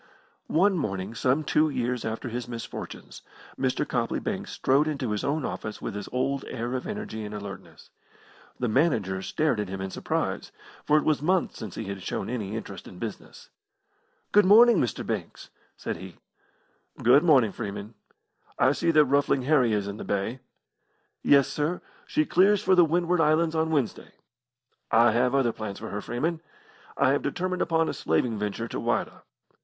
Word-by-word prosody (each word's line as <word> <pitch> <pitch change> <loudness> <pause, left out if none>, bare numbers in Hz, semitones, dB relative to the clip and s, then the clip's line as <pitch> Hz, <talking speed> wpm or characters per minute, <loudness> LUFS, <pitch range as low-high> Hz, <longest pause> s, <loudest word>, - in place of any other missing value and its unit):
One 185 +2 +3
morning, 95 -5 -3
some 130 +6 +1
two 155 +1 +2
years 125 -3 -2
after 115 +2 -4
his 120 0 -4
misfortunes, 115 -2 -8 0.3
Mr. - - -1
Copley - - -1
Banks - - -4
strode 140 +4 +2
into 140 -7 -2
his 105 - -2
own 145 0 -1
office 110 - -5
with - - -5
his 105 0 -6
old 135 +2 -1
air 120 0 -4
of 130 - -3
energy 210 - -5
and 105 0 -6
alertness. 100 -2 -9 0.7
The 125 - -1
manager 110 - +1
stared 150 +2 0
at 105 - -2
him 95 0 -5
in 95 0 -4
surprise, - - -2 0.3
for 150 - +4
it 150 - +2
was 155 -3 +1
months 180 +4 0
since 110 -6 -7
he - - -4
had 100 -2 -6
shown - - -3
any 110 -4 -3
interest 115 - -7
in - - -11
business. - - -8 0.8
"Good 210 - +6
morning, 220 +2 +7
Mr. 120 - -1
Banks!" - - -5 0.3
said - - -4
he. 95 +1 -10 0.9
"Good 125 +5 +6
morning, 135 - +5
Freeman. 100 +3 -6 0.6
I - - +4
see 170 +4 0
that 155 -2 +6
Ruffling 140 -1 +2
Harry 130 -4 +3
is 105 -2 0
in 100 0 -5
the - - -6
Bay." 100 +6 -2 0.8
"Yes, 140 -2 +5
sir; 155 +4 -2 0.3
she 155 - +1
clears 195 +5 +4
for 190 - +4
the 180 -1 +7
Windward 175 +1 +1
Islands 160 +1 +3
on 160 0 +1
Wednesday." 140 -8 -1 0.8
"I 115 +1 +5
have 125 +3 +2
other 125 -4 +2
plans 105 -3 -6
for - - -7
her, 105 - -4
Freeman. 160 +9 -2 0.6
I 135 -1 +4
have 140 - +1
determined 180 +5 -2
upon 165 -1 +2
a - - -2
slaving 105 +7 0
venture 105 +2 -3
to - - -5
Whydah." - - -1
130 Hz, 175 wpm, -27 LUFS, 110-155 Hz, 0.9 s, morning